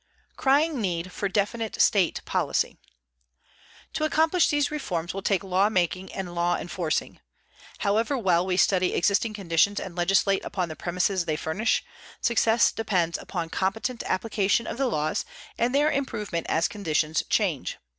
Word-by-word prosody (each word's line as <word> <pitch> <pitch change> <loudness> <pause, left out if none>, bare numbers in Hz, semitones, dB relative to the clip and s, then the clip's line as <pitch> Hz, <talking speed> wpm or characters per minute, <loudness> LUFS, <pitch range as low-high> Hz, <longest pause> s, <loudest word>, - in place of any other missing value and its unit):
_" - - -42
CRYING 285 0 +2
NEED 180 -2 -2
FOR 200 +2 -2
DEFINITE 220 +3 -2
STATE 190 -5 +3
POLICY - - 0 1.2
To - - -2
accomplish 320 +3 +3
these 290 0 +1
reforms 175 - -3
will 195 - -4
take 195 0 +1
law 190 +2 +2
making 185 -1 -1
and 185 -2 -5
law 175 0 +1
enforcing. 175 -2 -3 0.6
However 220 +7 +1
well 180 -7 +2
we 185 -1 -1
study 185 -1 +3
existing 210 +4 +1
conditions 195 +1 +1
and 175 - -7
legislate 195 +2 +2
upon 180 -3 -3
the 155 - -6
premises 180 +1 -1
they 155 - -1
furnish, 170 +9 0 0.4
success 230 0 +3
depends 180 -7 -1
upon 170 -4 -5
competent 225 +6 -1
application 205 +2 +1
of - - -5
the 270 - +2
laws 155 -7 -1 0.3
and 245 +3 0
their 295 +2 +3
improvement 210 - -3
as 165 +3 +2
conditions 160 -6 0
change. - - 0
195 Hz, 150 wpm, -26 LUFS, 175-225 Hz, 1.2 s, STATE